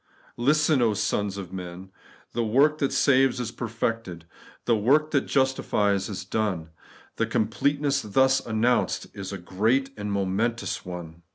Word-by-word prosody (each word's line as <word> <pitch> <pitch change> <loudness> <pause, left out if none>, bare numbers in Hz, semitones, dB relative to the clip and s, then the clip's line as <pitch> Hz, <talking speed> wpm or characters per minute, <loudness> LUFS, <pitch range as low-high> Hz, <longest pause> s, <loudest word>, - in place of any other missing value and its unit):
Listen, 135 -3 +3
sons 100 -1 -1
of 95 -2 -7
men! 90 0 -8 0.4
The 120 - -1
work 140 +7 +3
that 140 - +1
saves 135 -2 +3
is 120 - -3
perfected. 115 -6 -3 0.4
The 120 - +3
work 145 +9 +3
that 140 -3 +1
justifies 105 -7 +1
is 95 -2 -5
done. 95 -6 -2 0.5
The - - +1
completeness 140 +6 0
thus 130 +5 +3
announced 115 +2 +1
is 100 -1 -6
a 100 - -4
great 110 +10 0
and 105 -1 -4
momentous 100 +5 -1
one. 85 -2 -8
110 Hz, 135 wpm, -26 LUFS, 100-130 Hz, 0.5 s, Listen